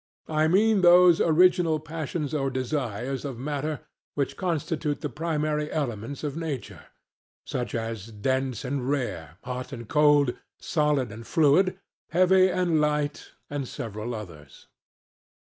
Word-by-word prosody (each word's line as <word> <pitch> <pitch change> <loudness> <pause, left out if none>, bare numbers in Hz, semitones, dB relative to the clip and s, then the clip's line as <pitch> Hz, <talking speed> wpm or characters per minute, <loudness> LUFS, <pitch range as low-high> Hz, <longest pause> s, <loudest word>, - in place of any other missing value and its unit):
I 155 0 +2
mean 205 +4 +4
those 175 -1 +7
original 170 -1 +4
passions 155 -1 -4
or 135 -3 0
desires 130 -1 -3
of 135 -5 -5
matter 145 +3 -3 0.3
which 140 -2 -1
constitute 160 -4 -2
the 150 - -3
primary 150 -1 -1
elements 130 -2 -3
of 145 -2 -3
nature; 160 -6 -5 0.6
such 120 -1 -3
as 115 -3 -4
Dense 130 +3 -2
and 130 0 -2
Rare, 85 - -3
Hot 125 +1 -5
and 120 -4 -7
Cold, 145 -3 +4 0.2
Solid 150 -6 0
and 110 +2 -10
Fluid, 165 +5 +3 0.3
Heavy 185 +2 +5
and 175 -4 +1
Light, 150 -1 -1
and 140 -2 -4
several 110 +1 -5
others. 80 -10 -11
145 Hz, 130 wpm, -26 LUFS, 125-160 Hz, 0.6 s, those